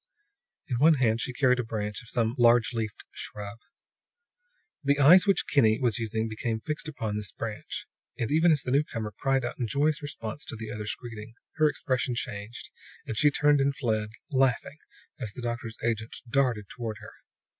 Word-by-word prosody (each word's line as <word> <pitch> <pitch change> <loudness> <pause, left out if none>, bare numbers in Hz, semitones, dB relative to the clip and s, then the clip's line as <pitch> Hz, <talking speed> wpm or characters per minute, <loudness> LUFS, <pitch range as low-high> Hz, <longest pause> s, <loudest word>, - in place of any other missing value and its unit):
In 125 -6 -1
one 160 +3 +6
hand 115 -4 +2
she - - -2
carried 125 -1 +3
a - - +1
branch 105 -2 -3
from 115 - -13
some 115 0 0
large 120 -1 +5
leafed 110 -2 -4
shrub. 105 +1 -7 1.2
The 140 0 +3
eyes 170 +8 +7
which 195 - +3
Kinney 110 -6 +3
was 120 -2 +1
using 110 0 -1
became 110 0 -2
fixed 150 +5 -3
upon 110 -8 -3
this 105 -1 -2
branch; 110 -2 -5 0.3
and 115 - -2
even 160 +3 +5
as 150 -3 +2
the 125 - -3
newcomer 115 -7 0
cried 135 -2 +1
out 120 - -5
in 120 - 0
joyous 145 +5 +1
response 140 -2 -5
to - - -5
the 110 -1 -6
other's 105 0 -3
greeting, 115 -2 -9 0.2
her 155 -1 +5
expression 130 -3 -1
changed 105 0 -5 0.3
and 110 - -4
she 150 +6 +5
turned 145 0 +3
and 140 0 +1
fled, 110 -5 -1 0.2
laughing, 135 +2 +1 0.4
as 110 -5 -4
the 125 - -7
doctor's 120 -1 -4
agent 115 -1 -1
darted 120 -4 +1
toward 115 -4 -5
her. - - -11
120 Hz, 180 wpm, -28 LUFS, 110-140 Hz, 1.2 s, eyes